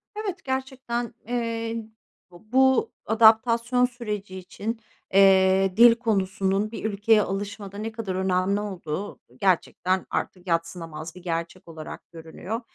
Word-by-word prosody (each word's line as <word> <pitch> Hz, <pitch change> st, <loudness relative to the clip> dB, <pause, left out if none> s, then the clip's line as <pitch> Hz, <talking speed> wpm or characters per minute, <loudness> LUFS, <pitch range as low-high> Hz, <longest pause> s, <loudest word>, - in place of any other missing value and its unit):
Evet, 390 Hz, -3 st, -4 dB
gerçekten, 260 Hz, -3 st, -3 dB
eee, 230 Hz, -1 st, -2 dB, 0.6 s
b -, -, -16 dB, 0.2 s
bu 265 Hz, -1 st, +4 dB
adaptasyon 230 Hz, +3 st, +4 dB
süreci 210 Hz, -6 st, -5 dB
için, 210 Hz, +5 st, -5 dB, 0.3 s
eee, 190 Hz, -1 st, +5 dB
dil 235 Hz, 0 st, +8 dB
konusunun 200 Hz, -2 st, 0 dB
bir 225 Hz, -, -7 dB
ülkeye 210 Hz, +1 st, +3 dB
alışmada 200 Hz, 0 st, -5 dB
ne 220 Hz, +2 st, -4 dB
kadar 215 Hz, -5 st, -4 dB
önemli 190 Hz, +1 st, +1 dB
olduğu 190 Hz, -2 st, -5 dB, 0.2 s
gerçekten 185 Hz, 0 st, +1 dB
artık 185 Hz, 0 st, -4 dB
yadsınamaz 165 Hz, -1 st, -3 dB
bir 180 Hz, -, -11 dB
gerçek 170 Hz, +1 st, -4 dB
olarak 160 Hz, -2 st, -10 dB
görünüyor. 170 Hz, +7 st, -6 dB
205 Hz, 120 wpm, -25 LUFS, 185-230 Hz, 0.6 s, dil